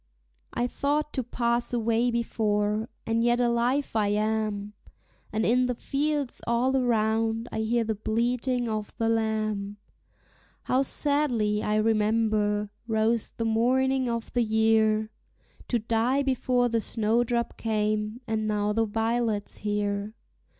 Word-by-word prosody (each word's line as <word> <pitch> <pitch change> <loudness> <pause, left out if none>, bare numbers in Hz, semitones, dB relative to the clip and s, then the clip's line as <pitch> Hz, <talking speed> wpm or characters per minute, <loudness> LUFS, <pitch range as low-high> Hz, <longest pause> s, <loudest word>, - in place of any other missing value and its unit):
I 240 - -1
thought 295 +4 -1
to 260 - 0
pass 235 0 -1
away 230 +1 +1
before, 215 -2 0 0.2
and 225 0 +1
yet 240 0 +3
alive 245 +3 +1
I 215 -2 +2
am; 210 0 -1 0.6
And 220 +1 0
in 250 +2 +3
the 250 - -1
fields 285 +1 -2
all 245 +3 +2
around 225 -2 +1
I - - -3
hear 230 +2 +1
the 220 0 -1
bleating 240 +3 -1
of 215 -2 -3
the 225 -2 0
lamb. 215 -2 -1 0.9
How 255 - +2
sadly, 255 -7 +1
I 210 - 0
remember, 215 -1 +1 0.2
rose 225 0 +1
the 230 - -4
morning 255 +3 +2
of 230 -1 -4
the 245 - +2
year! 220 -1 +2 0.6
To 240 - +1
die 235 +5 +1
before 255 -2 +1
the 230 -1 0
snowdrop 235 +2 0
came, 215 +1 -1
and 220 -2 -1
now 210 0 0
the 225 +1 +2
violet's 225 -1 -1
here. 205 0 -2
225 Hz, 130 wpm, -27 LUFS, 215-240 Hz, 0.9 s, yet